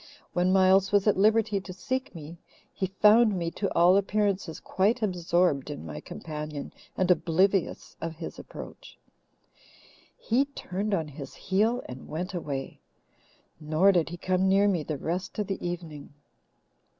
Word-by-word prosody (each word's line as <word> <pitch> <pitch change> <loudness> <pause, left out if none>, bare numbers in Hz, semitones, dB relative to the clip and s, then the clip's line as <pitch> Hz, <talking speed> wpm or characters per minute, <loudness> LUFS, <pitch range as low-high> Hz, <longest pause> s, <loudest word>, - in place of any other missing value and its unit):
When 180 +1 +2
Miles 190 0 +4
was 205 -1 +3
at 210 - +4
liberty 215 0 +3
to 185 -1 -9
seek 255 +4 -4
me, 165 +1 -9 0.3
he 190 - -2
found 210 +2 +4
me, 170 -1 -2
to 200 +2 -3
all 175 +2 +6
appearances, 200 -4 0
quite 220 +5 0
absorbed 175 -6 +1
in 145 - -6
my 75 -2 -6
companion 150 - -7 0.2
and 185 -1 +3
oblivious 180 +2 +1
of 165 0 -4
his 165 +1 -8
approach. - - -11 1.2
He 250 +5 +1
turned 205 -7 -3
on 160 -4 -2
his 140 -2 -9
heel 220 +6 0
and 125 +1 -9
went 180 +5 -4
away, 140 -6 -5 0.8
nor 160 +5 +3
did 175 -4 +1
he 175 - -7
come 185 +2 +1
near 200 +1 +4
me 185 -5 +1
the 150 0 -4
rest 175 +6 -4
of 210 - 0
the 195 0 -4
evening. 170 -4 -6
185 Hz, 150 wpm, -27 LUFS, 165-200 Hz, 1.2 s, all